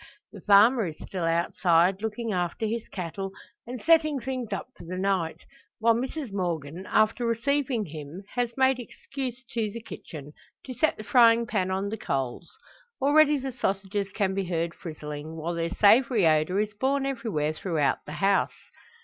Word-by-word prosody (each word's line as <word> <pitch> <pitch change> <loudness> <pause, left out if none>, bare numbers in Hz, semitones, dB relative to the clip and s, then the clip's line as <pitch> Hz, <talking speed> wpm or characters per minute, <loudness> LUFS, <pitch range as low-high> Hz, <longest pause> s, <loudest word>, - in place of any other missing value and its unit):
The - - -11
farmer 210 +2 +5
is 155 - -7
still 180 -3 -4
outside, 170 +2 +2
looking 220 +1 -3
after 180 +4 -1
his 225 +1 -3
cattle, 190 +1 -5 0.4
and 250 +1 -5
setting 310 -2 +3
things 255 -3 -4
up 195 - -4
for - - -12
the 180 +2 -6
night; 185 -4 -1 0.3
while 230 +1 +4
Mrs 260 0 -4
Morgan, 175 -2 -3
after 215 +3 +2
receiving 240 0 0
him, 155 +3 -8
has 245 -1 -2
made 265 -1 +3
excuse 255 +1 -6
to 225 -3 -1
the 230 - -7
kitchen 150 -9 -10 0.3
to 255 - -6
set 280 +6 +1
the 215 - -7
frying 235 0 +5
pan 190 -5 -1
on 190 +2 -1
the 220 - -4
coals. 135 - -3 0.5
Already 295 +2 +5
the 265 -1 -4
sausages 200 -3 -2
can 195 -3 0
be 195 0 -1
heard 170 -1 -2
frizzling, 155 -1 -7
while 165 +2 -3
their 170 0 -1
savoury 225 0 +4
odour 155 +4 +3
is 210 0 -1
borne 270 +5 0
everywhere 225 - -1
throughout 155 -4 0
the 150 - -6
house. 195 +6 +1
200 Hz, 165 wpm, -27 LUFS, 170-240 Hz, 0.5 s, farmer